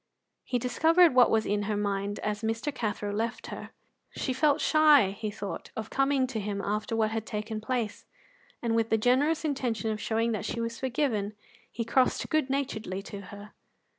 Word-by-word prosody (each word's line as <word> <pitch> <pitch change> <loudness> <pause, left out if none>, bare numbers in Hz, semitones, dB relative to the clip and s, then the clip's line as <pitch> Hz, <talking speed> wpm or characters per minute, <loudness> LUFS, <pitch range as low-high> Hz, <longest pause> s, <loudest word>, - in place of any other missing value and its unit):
He 250 - -1
discovered 320 +7 +4
what 250 -1 +6
was 220 -1 +2
in 205 +1 0
her 210 - 0
mind 200 0 -1
as 210 0 -2
Mr. 225 +6 -2
Cathro 210 -4 -3
left 225 +3 -2
her. - - -7 0.4
She 260 - -3
felt 290 +2 +3
shy, 300 -10 +5
he 210 +2 -4
thought, 205 -1 -6
of 220 -1 -5
coming 270 -1 +2
to 250 -3 -4
him 205 -1 -3
after 210 +3 -2
what 220 -1 +1
had 220 -1 -2
taken 215 0 -4
place, 235 -2 -3 0.6
and, 230 -1 +1
with 225 0 +1
the 225 - +3
generous 280 +8 +2
intention 245 -6 -1
of 215 0 -4
showing 225 +1 0
that 215 -4 -2
she 235 - -3
was 230 0 -3
forgiven, 240 -6 -1 0.4
he 230 - -4
crossed 255 +2 +2
good 310 -4 +2
naturedly 220 -8 -2
to 200 -1 -8
her. 205 +2 -11
225 Hz, 185 wpm, -28 LUFS, 210-260 Hz, 0.6 s, what